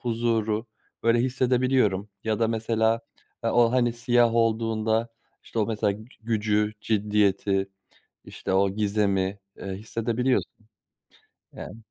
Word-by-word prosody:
huzuru, 115 Hz, -2 st, 0 dB, 0.4 s
böyle, 115 Hz, +1 st, +4 dB
hissedebiliyorum. 125 Hz, -5 st, +1 dB, 0.2 s
Ya 110 Hz, -1 st, 0 dB
da 115 Hz, -, +3 dB
mesela, 115 Hz, 0 st, +1 dB, 0.4 s
eee, 115 Hz, -, +2 dB
o, 120 Hz, 0 st, +4 dB
hani, 120 Hz, -2 st, +2 dB
siyah 120 Hz, 0 st, +2 dB
olduğunda, 115 Hz, 0 st, +1 dB, 0.4 s
işte, -, -, -6 dB
o 105 Hz, -, +2 dB
mesela 105 Hz, -2 st, 0 dB
gü 110 Hz, +2 st, -10 dB, 0.2 s
gücü, 105 Hz, -1 st, +1 dB
ciddiyeti, 100 Hz, -2 st, +1 dB, 0.6 s
işte, 95 Hz, -, -4 dB
o 100 Hz, +1 st, +3 dB
gizemi, 100 Hz, -1 st, 0 dB, 0.2 s
eee, -, -, -9 dB
hissedebiliyorsun, 115 Hz, +4 st, -1 dB, 1.0 s
yani. -, -, -8 dB
110 Hz, 115 wpm, -26 LUFS, 105-115 Hz, 1.0 s, böyle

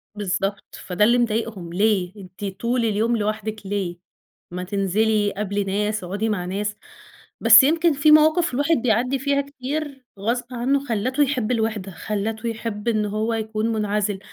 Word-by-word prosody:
بالضبط. 200 Hz, 0 st, -3 dB
فده 185 Hz, +3 st, +1 dB
اللي 240 Hz, +3 st, +5 dB
مضايقهم 220 Hz, -7 st, -2 dB
ليه؟ 195 Hz, -2 st, +1 dB
أنتِ 190 Hz, +1 st, -9 dB
طول 230 Hz, +5 st, -1 dB
اليوم 225 Hz, +2 st, +1 dB
لوحدِك 215 Hz, 0 st, -3 dB
ليه؟ 190 Hz, -3 st, -3 dB, 0.5 s
ما 180 Hz, +1 st, -4 dB
تنزلي 205 Hz, +2 st, +1 dB
قابلي 205 Hz, 0 st, -2 dB
ناس، 210 Hz, +1 st, -1 dB
اقعُدي 200 Hz, +5 st, -2 dB
مع 190 Hz, -5 st, -2 dB
ناس. 205 Hz, +3 st, -3 dB, 0.7 s
بس 230 Hz, +2 st, +9 dB
يمكن 325 Hz, +3 st, +3 dB
في 290 Hz, +2 st, +4 dB
مواقف 310 Hz, 0 st, +5 dB
الواحد 290 Hz, +5 st, +2 dB
بيعدّي 250 Hz, +3 st, +1 dB
فيها 280 Hz, +1 st, +1 dB
كتير 280 Hz, 0 st, -5 dB
غصب 235 Hz, +4 st, -1 dB
عنّه 270 Hz, +4 st, 0 dB
خلّته 255 Hz, +5 st, +1 dB
يحب 250 Hz, -5 st, -1 dB
الوِحدة، 220 Hz, -4 st, -1 dB
خلّته 215 Hz, +5 st, -3 dB
يحب 225 Hz, -1 st, -5 dB
إنه 215 Hz, -2 st, +1 dB
هو 215 Hz, +2 st, -1 dB
يكون 220 Hz, 0 st, -2 dB
مُنعَزِل، 210 Hz, -2 st, -1 dB
215 Hz, 150 wpm, -22 LUFS, 205-245 Hz, 0.7 s, بس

